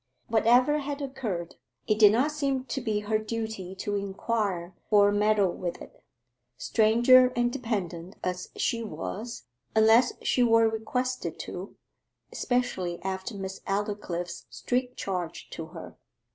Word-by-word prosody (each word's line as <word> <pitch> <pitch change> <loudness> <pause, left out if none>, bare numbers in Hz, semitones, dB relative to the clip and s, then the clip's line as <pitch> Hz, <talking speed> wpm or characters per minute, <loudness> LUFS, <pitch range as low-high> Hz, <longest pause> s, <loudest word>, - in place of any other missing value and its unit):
Whatever 245 +6 +4
had 285 0 -4
occurred, 245 - -4 0.3
it 215 -1 +1
did 210 -2 +8
not 255 +8 +2
seem 275 -3 -1
to 270 - -3
be 215 -3 -1
her 215 +1 0
duty 220 -4 -4
to 205 +2 -3
inquire 195 -2 -2 0.2
or 205 -1 +6
meddle 205 -2 +3
with 175 0 -4
it, - - -14 0.5
stranger 240 - +5
and 240 0 +1
dependent 190 -6 -3
as 180 0 -3
she 230 -2 0
was, 215 +5 -6 0.3
unless 225 +3 +5
she 250 - +2
were 230 -1 +5
requested 220 -4 -2
to, 185 +3 -7 0.6
especially 190 -9 -1
after 190 +3 -4
Miss 190 -1 -6
Aldclyffe's 195 -4 -3
strict 250 0 -2
charge 180 -4 -4
to 160 - -6
her. 165 0 -10
215 Hz, 130 wpm, -28 LUFS, 190-240 Hz, 0.6 s, did